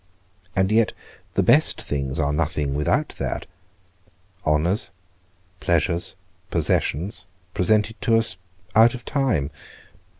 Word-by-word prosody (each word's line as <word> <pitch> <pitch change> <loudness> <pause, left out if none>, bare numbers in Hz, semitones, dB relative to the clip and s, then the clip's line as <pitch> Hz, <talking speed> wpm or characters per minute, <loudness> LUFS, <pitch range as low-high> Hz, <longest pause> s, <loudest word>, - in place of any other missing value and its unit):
and 95 +2 +2
yet 110 0 +3 0.4
the - - +3
best - - +5
things 70 0 -2
are 75 -1 +1
nothing 75 -2 0
without 75 +1 +1
that. - - -3 1.0
Honours, 80 +8 +2 0.7
pleasures, 85 +2 0 0.3
possessions, 90 +4 0 0.3
presented 110 +4 +1
to 115 -1 +3
us 110 -4 +2 0.4
out 115 +3 +6
of 120 - -9
time? 125 - 0
90 Hz, 105 wpm, -23 LUFS, 75-110 Hz, 1.0 s, out